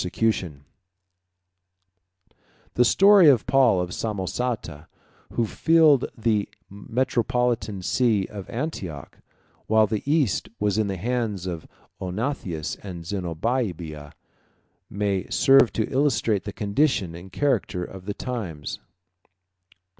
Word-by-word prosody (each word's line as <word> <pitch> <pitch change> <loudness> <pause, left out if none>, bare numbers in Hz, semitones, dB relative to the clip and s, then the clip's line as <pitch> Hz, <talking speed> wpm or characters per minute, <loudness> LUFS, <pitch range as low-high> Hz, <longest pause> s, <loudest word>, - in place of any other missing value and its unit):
] - - -2 2.7
The 125 - +4
story 190 - +6
of 125 -6 +3
Paul 130 -8 +4
of 90 0 -3
Samosata, 105 -6 -3 0.5
who 120 - +1
filled 155 +2 +4
the 110 -3 0 0.2
metropolitan 120 -1 -1
see 110 -3 +2
of 100 -1 -9
Antioch, 100 - -5 0.5
while 110 0 +4
the 105 0 -2
East 145 - +1
was 105 0 +1
in 110 - +1
the 95 -1 -3
hands 110 -3 -2
of 85 -3 -5 0.3
Odenathus 95 - -3
and 90 -4 -8
Zenobia, 85 - -3 0.8
may 100 -2 -2
serve 135 -3 +5
to 110 - -1
illustrate 130 -7 +1
the 105 - -4
condition 100 - 0
and 85 +3 -11
character 120 -8 0
of 95 +1 -9
the 105 - -3
times. 95 - -5
105 Hz, 110 wpm, -24 LUFS, 95-125 Hz, 2.7 s, story